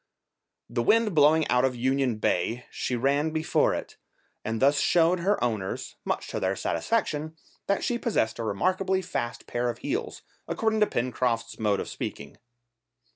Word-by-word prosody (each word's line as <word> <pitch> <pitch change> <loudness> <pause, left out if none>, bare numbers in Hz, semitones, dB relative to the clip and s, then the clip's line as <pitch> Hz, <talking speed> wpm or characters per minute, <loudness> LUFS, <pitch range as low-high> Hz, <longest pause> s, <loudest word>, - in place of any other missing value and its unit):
The 120 - -1
wind 220 - +3
blowing 155 0 +5
out 125 0 +3
of 130 -1 +1
Union 130 0 +1
Bay 115 +3 0
she 125 - -2
ran 140 +5 +1
before 160 0 +1
it, - - -7 0.5
and 110 0 -2
thus 140 +3 +4
showed 175 +1 +3
her 200 +4 +1
owners, 110 -6 -2
much - - -2
to - - -3
their 95 +1 0
satisfaction, 160 - -1 0.3
that 200 - +1
she 240 -1 0
possessed 200 - 0
a - - -2
remarkably 185 - 0
fast 120 -9 -4
pair 120 0 -1
of 120 - -4
heels, 390 - -4 0.2
according 220 -1 0
to 210 - +4
Pencroft's 120 -1 -1
mode 105 -3 +1
of - - -4
speaking. - - -6
140 Hz, 160 wpm, -27 LUFS, 120-185 Hz, 0.5 s, blowing